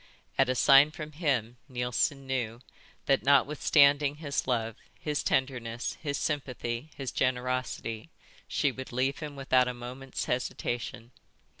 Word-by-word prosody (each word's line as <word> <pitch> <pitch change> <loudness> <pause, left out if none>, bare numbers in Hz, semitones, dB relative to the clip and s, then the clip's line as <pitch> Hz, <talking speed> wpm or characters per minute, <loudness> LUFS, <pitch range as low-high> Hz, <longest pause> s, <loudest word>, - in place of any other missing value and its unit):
At 135 -2 +3
a 130 - +1
sign 140 +3 +7
from 155 0 -8
him, 130 -7 -1
Neilson 125 +3 0
knew 120 -3 -2 0.4
that, 135 -1 +3
notwithstanding 145 0 +4
his 145 -4 -3
love, 115 -3 0 0.2
his 150 -1 -1
tenderness, 125 -3 -1
his 145 -3 -2
sympathy, 125 -1 -3
his 135 -2 -4
generosity, 125 -1 -2 0.4
she 145 - +1
would 130 0 -8
leave 130 +3 0
him 150 -2 -6
without 130 -2 +3
a 125 - -3
moment's 125 +2 -6
hesitation. 120 -1 -3
130 Hz, 130 wpm, -29 LUFS, 125-140 Hz, 0.4 s, sign